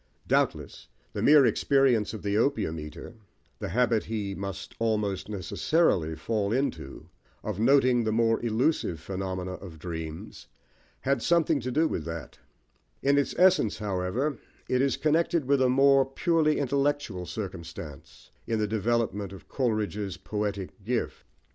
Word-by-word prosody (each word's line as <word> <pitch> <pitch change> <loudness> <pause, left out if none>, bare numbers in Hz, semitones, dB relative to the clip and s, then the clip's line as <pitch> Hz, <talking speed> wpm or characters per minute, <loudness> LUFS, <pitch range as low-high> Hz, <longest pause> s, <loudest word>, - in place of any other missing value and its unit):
Doubtless, - - 0 0.3
the - - -3
mere 145 -2 +7
experience 130 -5 +3
of 110 - -8
the 100 0 0
opium 110 - +1
eater, 75 +7 -9 0.5
the - - -4
habit 120 -2 +2
he 105 -3 -3
must 100 0 -6
almost 105 -4 -1
necessarily 95 - +1
fall 100 +4 -1
into 85 - -3 0.4
of 105 -2 -4
noting 125 0 +4
the 110 - 0
more 115 +1 +2
elusive 115 - 0
phenomena 95 0 -4
of 90 -3 -9
dreams, 80 -1 -7 0.5
had 135 -2 0
something 165 0 +2
to 125 0 -4
do 160 +5 +3
with 80 - -3
that: 80 -2 -7 0.6
in 140 +1 +4
its 140 - -1
essence, 180 - +4
however, 105 +8 -2 0.3
it 125 0 +1
is 135 -1 +1
connected 165 0 +1
with 140 0 +2
a 130 - +4
more 135 +1 +5
purely 155 +3 +1
intellectual 140 -9 -1
circumstance 85 -7 -8 0.2
in 115 - 0
the 105 - +1
development 110 -2 -1
of 95 - -12
Coleridge's 105 -6 -2
poetic 100 0 -4
gift. 120 +2 -2
110 Hz, 140 wpm, -27 LUFS, 95-135 Hz, 0.6 s, mere